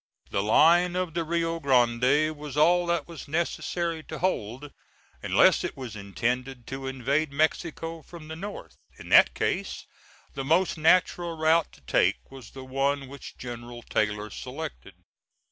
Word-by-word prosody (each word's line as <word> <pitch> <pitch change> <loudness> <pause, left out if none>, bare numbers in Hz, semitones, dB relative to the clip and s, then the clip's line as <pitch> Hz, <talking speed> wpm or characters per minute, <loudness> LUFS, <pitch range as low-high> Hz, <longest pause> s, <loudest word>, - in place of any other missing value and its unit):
The 100 - +1
line 170 - +4
of 180 -3 -2
the 170 0 -1
Rio 165 0 -1
Grande 130 +3 +3
was 150 -1 -8
all 175 +3 +4
that 170 -4 0
was 170 -4 -9
necessary 170 +1 -2
to 155 - -7
hold, 140 - -2 0.5
unless - - +4
it - - -4
was 125 -5 -7
intended 120 +5 -3
to 135 0 -5
invade 135 +3 -1
Mexico 165 +2 -1
from 160 0 -12
the 160 - -6
North. 160 - -8 0.2
In - - -11
that - - +6
case - - -2 0.5
the 135 - -4
most 165 +7 +2
natural 170 +1 +2
route 160 +1 +3
to - - -18
take - - +1
was 130 -5 -11
the 130 -1 -10
one 135 +1 -1
which 140 -1 -10
General 120 -1 -8
Taylor 105 0 -1
selected. 60 -7 -7
145 Hz, 150 wpm, -27 LUFS, 125-165 Hz, 0.5 s, that